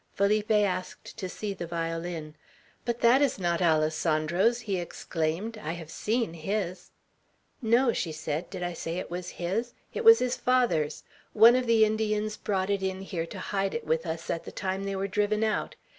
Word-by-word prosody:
Felipe 210 Hz, +2 st, +2 dB
asked 200 Hz, -4 st, 0 dB
to 185 Hz, -, -3 dB
see 205 Hz, +2 st, -4 dB
the 175 Hz, -3 st, -6 dB
violin. 165 Hz, -1 st, -4 dB, 0.5 s
"But 235 Hz, 0 st, -2 dB
that 245 Hz, +4 st, +6 dB
is 280 Hz, -3 st, +2 dB
not 175 Hz, -2 st, 0 dB
Alessandro's," 160 Hz, +6 st, +2 dB
he 200 Hz, -4 st, -2 dB
exclaimed. 175 Hz, +5 st, -3 dB
"I 165 Hz, -6 st, -4 dB
have 165 Hz, -2 st, -8 dB
seen 225 Hz, -5 st, -1 dB
his." 185 Hz, +2 st, -3 dB, 0.7 s
"No!" 235 Hz, +1 st, +3 dB
she 165 Hz, -, -2 dB
said. 155 Hz, +1 st, -4 dB
"Did 185 Hz, -2 st, -5 dB
I 175 Hz, 0 st, -2 dB
say 165 Hz, +1 st, -4 dB
it 180 Hz, -, -5 dB
was 180 Hz, 0 st, -4 dB
his? 210 Hz, +8 st, -2 dB, 0.2 s
It 470 Hz, -, -3 dB
was 455 Hz, 0 st, +9 dB
his 250 Hz, 0 st, 0 dB
father's. 235 Hz, -13 st, +1 dB, 0.3 s
One 225 Hz, +3 st, +8 dB
of 255 Hz, -1 st, 0 dB
the 225 Hz, -1 st, +6 dB
Indians 215 Hz, 0 st, 0 dB
brought 195 Hz, -1 st, -1 dB
it 200 Hz, -1 st, 0 dB
in 190 Hz, 0 st, -2 dB
here 170 Hz, -4 st, -4 dB
to 195 Hz, -, -8 dB, 0.2 s
hide 195 Hz, +1 st, 0 dB
it 235 Hz, -, -4 dB
with 160 Hz, +2 st, 0 dB
us 160 Hz, 0 st, -3 dB
at 165 Hz, -, -3 dB
the -, -, -8 dB
time 190 Hz, +1 st, -3 dB
they 195 Hz, 0 st, -2 dB
were 195 Hz, +1 st, -1 dB
driven 210 Hz, +2 st, +1 dB
out. 215 Hz, -1 st, -1 dB
195 Hz, 190 wpm, -28 LUFS, 170-220 Hz, 0.7 s, was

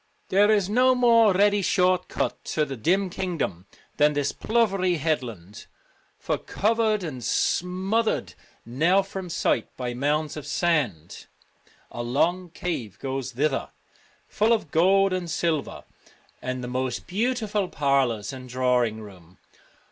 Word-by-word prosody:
There 205 Hz, +2 st, +4 dB
is 205 Hz, -4 st, +3 dB
no 255 Hz, +5 st, +4 dB
more 230 Hz, -3 st, +5 dB
ready 205 Hz, +2 st, +3 dB
short 185 Hz, -1 st, +2 dB
cut -, -, -3 dB
to 155 Hz, -, 0 dB
the 135 Hz, -, -6 dB
dim 180 Hz, -, +1 dB
kingdom 165 Hz, -, -3 dB, 0.3 s
than 150 Hz, 0 st, +4 dB
this 145 Hz, -1 st, 0 dB
plovery 195 Hz, -6 st, +1 dB
headland, 120 Hz, -, -4 dB, 0.5 s
for, -, -, -2 dB
covered 215 Hz, -1 st, 0 dB
and 130 Hz, -8 st, -6 dB
smoth 190 Hz, -, 0 dB
ered -, -, -2 dB, 0.3 s
now 165 Hz, +11 st, +2 dB
from 190 Hz, -2 st, -7 dB
sight 165 Hz, -, 0 dB
by 125 Hz, -1 st, -3 dB
mounds 145 Hz, +4 st, -1 dB
of 150 Hz, -2 st, -7 dB
sand, 145 Hz, -, -1 dB, 0.6 s
a 120 Hz, -, -5 dB
long 170 Hz, +9 st, 0 dB
cave 130 Hz, -, -5 dB
goes 135 Hz, -1 st, -4 dB
thither 140 Hz, +2 st, -1 dB, 0.3 s
' -, -, -34 dB
full 220 Hz, +2 st, +2 dB
of 210 Hz, -10 st, -2 dB
gold 195 Hz, +3 st, +4 dB
and 180 Hz, -2 st, -3 dB
silver, 160 Hz, -2 st, -2 dB, 0.6 s
and 130 Hz, 0 st, -4 dB
the -, -, -4 dB
most 130 Hz, 0 st, -3 dB
beautiful 210 Hz, 0 st, -1 dB
parlours 135 Hz, -7 st, 0 dB
and 130 Hz, -1 st, -9 dB
drawing 125 Hz, -3 st, +1 dB
rooms.' 90 Hz, -4 st, -14 dB
160 Hz, 140 wpm, -25 LUFS, 130-195 Hz, 0.6 s, more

